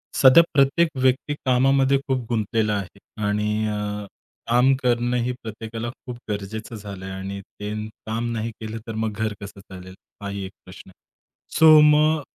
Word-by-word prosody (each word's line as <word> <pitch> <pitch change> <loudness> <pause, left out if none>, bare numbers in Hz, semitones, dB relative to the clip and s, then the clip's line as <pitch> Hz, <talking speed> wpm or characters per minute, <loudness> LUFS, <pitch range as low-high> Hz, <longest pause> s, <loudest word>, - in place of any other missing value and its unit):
सध्या 135 +5 +8
प्रत्येक 140 +5 +4
व्यक्ती 130 +3 +2
कामामध्ये 135 +2 +3
खूप 130 -3 -1
गुंतलेला 110 -1 0
आहे 100 -1 -5 0.3
आणि 105 +1 0
अ, 105 -1 -3 0.4
काम 125 +3 +5
करणं 120 0 +1
ही 125 - -1
प्रत्येकाला 115 +1 -6 0.2
खूप 125 -2 -6
गरजेचं 105 +3 -5
झालंय 100 -3 -8
आणि 95 +1 -5
त्यांनी 105 +2 -6 0.2
काम 115 +2 -2
नाही 115 0 -3
केलं 110 0 -6
तर 115 - -4
मग 110 0 -1
घर 110 +1 -2
कसं 100 0 -9
चालेल? 95 -1 -12 0.3
हाही 100 -1 -4
एक 95 - -8
प्रश्न 90 +1 -13
आहे. 95 - -19 0.6
सो 155 -1 +9
मग, 150 +1 +4
110 Hz, 155 wpm, -23 LUFS, 105-125 Hz, 0.6 s, सो